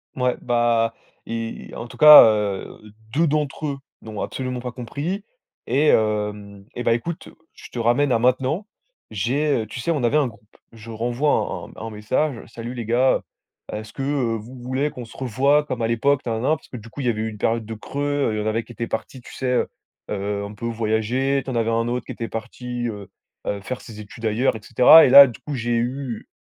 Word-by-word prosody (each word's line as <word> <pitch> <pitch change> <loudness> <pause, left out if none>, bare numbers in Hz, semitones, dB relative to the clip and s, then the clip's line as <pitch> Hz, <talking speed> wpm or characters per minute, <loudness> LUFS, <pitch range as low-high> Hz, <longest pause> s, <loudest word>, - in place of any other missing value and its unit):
Ouais, 125 -1 +1
bah, 120 -1 +2 0.3
et, 115 0 -5
en 120 - -6
tout - - -13
cas, 150 0 +11
heu, 105 -1 -1 0.2
2 165 +3 +4
d'entre 150 0 -1
eux 140 -2 -2 0.3
n'ont 110 -2 -6
absolument 130 -1 -4
pas 125 - -5
compris 145 - -4 0.4
et 145 +3 +2
hem, 105 -3 0
et 120 - -4
bah 115 - +3
écoute, 160 +8 -4 0.3
je - - -12
te 120 - -5
ramène 120 +4 +2
à 115 - +3
maintenant. 130 - +1 0.4
J'ai, 125 +6 0
heu - - -4
tu 120 - -7
sais, 125 - -3
on 145 -6 -1
avait 140 +6 +3
un 145 - +2
groupe. 105 -2 -15 0.2
Je 115 0 -11
renvoie 120 +6 0 0.4
un - - -10
un 115 - -4
un - - -5
message: 115 +6 -1
«Salut 120 +2 -7
les 120 -3 -5
gars. 125 +3 +3 0.5
Est-ce 110 0 -6
que, 135 - -5
heu, 135 -5 0
vous 115 +4 -8
voulez 130 +4 -1
qu'on 125 -5 -8
se 115 - -15
revoie 135 +4 +2
comme 125 -5 -4
à 115 - +1
l'époque, 135 +4 +2
na 115 - 0
na 110 - -2
na?», 155 - +4
parce - - -20
que 125 - -8
du 115 0 -11
coup, 130 - -11
il 130 - -1
y - - +4
avait 110 -2 -1
eu 110 - -2
une 105 - -9
période 115 +1 0
de 115 - -6
creux, 145 +3 -2
il 110 - -2
y - - -1
en - - -4
avait 110 +1 0
qui - - -14
étaient 115 +2 -4
partis, 110 +3 -5
tu - - -13
sais 130 - -5
heu, 125 - +1 0.4
heu, 100 0 -2
un 100 +1 -7
peu 105 - -7
voyager, 115 +5 0
tu - - -7
en 125 - -3
avais 115 -1 +1
un 115 +1 0
autre 120 -1 -2
qui - - -7
était 115 - -5
parti, 120 +2 -5
heu, 105 -3 -6 0.4
heu, 100 -1 -2
faire 130 +5 -5
ses 110 -4 -11
études 105 +2 -9
ailleurs, 110 +3 +1
et - - -6
cetera. 125 +9 +8
Et - - +3
là, 140 +1 +11
du 120 - -9
coup, 145 -2 -5
j'ai 120 -1 -1
eu, 125 0 -3
120 Hz, 235 wpm, -22 LUFS, 110-135 Hz, 0.5 s, cas